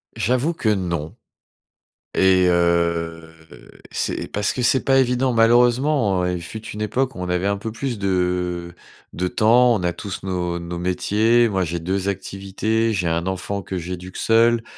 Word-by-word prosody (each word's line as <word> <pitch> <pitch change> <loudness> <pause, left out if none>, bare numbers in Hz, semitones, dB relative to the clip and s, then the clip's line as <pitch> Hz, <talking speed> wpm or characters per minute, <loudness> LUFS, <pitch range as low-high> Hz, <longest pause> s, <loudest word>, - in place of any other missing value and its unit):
J'avoue 130 - 0
que 115 - -1
non, 85 -6 -2 1.0
et 95 -1 +4
heu, 85 -1 0 0.6
c'est - - -2
parce 105 0 0
que 125 - -3
c'est 130 +2 +3
pas 135 -1 +3
évident 125 0 +1
malheureusement, 120 -3 +3
il 90 -1 -2
fut 110 +6 -8
une 105 - -6
époque 130 +5 -1
où - - -8
on 90 0 -4
avait 90 +2 0
un 100 0 0
peu 110 +2 -5
plus 120 -1 -4
de 90 -2 -1 0.4
de 90 +1 -1
temps, 120 +4 +4
on 90 - -3
a 85 -1 0
tous 100 +1 -7
nos 90 -2 -2
nos 85 0 -6
métiers, 110 +6 +2
moi 95 -4 0
j'ai 85 0 -3
2 95 +3 -2
activités, 100 +4 -2
j'ai 95 -5 -1
un 85 +2 -1
enfant 95 +2 -3
que 95 +1 -5
j'éduque 90 +1 -7
seul. 115 +1 +3
95 Hz, 165 wpm, -21 LUFS, 90-115 Hz, 1.0 s, et